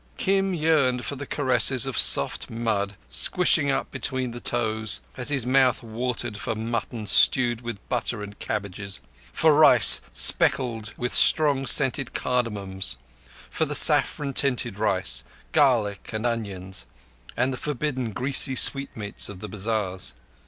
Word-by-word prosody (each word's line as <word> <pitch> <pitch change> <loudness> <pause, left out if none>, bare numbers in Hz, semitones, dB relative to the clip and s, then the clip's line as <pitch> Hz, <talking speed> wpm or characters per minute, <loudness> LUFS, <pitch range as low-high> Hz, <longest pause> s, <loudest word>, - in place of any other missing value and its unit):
Kim 195 0 -1
yearned 150 -6 0
for 140 - -4
the 140 0 -9
caress 130 -4 +1 0.2
of 135 -3 -5
soft - - +4
mud 110 -3 -3
squishing 170 -5 +1
up - - -3
between 130 -2 -3
the 120 - -9
toes, 110 -3 -1 0.2
as 125 +1 -1
his 140 -5 -1
mouth 130 -1 +1
watered 115 -1 -5
for 110 - -4
mutton 115 0 -5
stewed 120 +3 +2
with 120 -4 -9
butter 120 -3 -4
and 105 0 -12
cabbages, 100 -1 -6 0.3
for 160 -1 +2
rice 145 -7 +6
speckled 115 -4 +4
with 125 0 -4
strong 140 -4 +2
scented 135 -2 +1
cardamoms, 100 -6 -4 0.5
for - - -3
the - - -3
saffron 140 -2 +5
tinted 125 -6 -1
rice, 95 - -1 0.3
garlic 120 -10 0
and 110 +2 -5
onions, 100 -6 -5 0.5
and 130 +2 -1
the - - -4
forbidden 130 -3 -4
greasy 130 +3 +1
sweetmeats 125 -6 +2
of 100 - -10
the 105 - -9
bazars. 100 -2 -4
120 Hz, 140 wpm, -23 LUFS, 105-135 Hz, 0.5 s, rice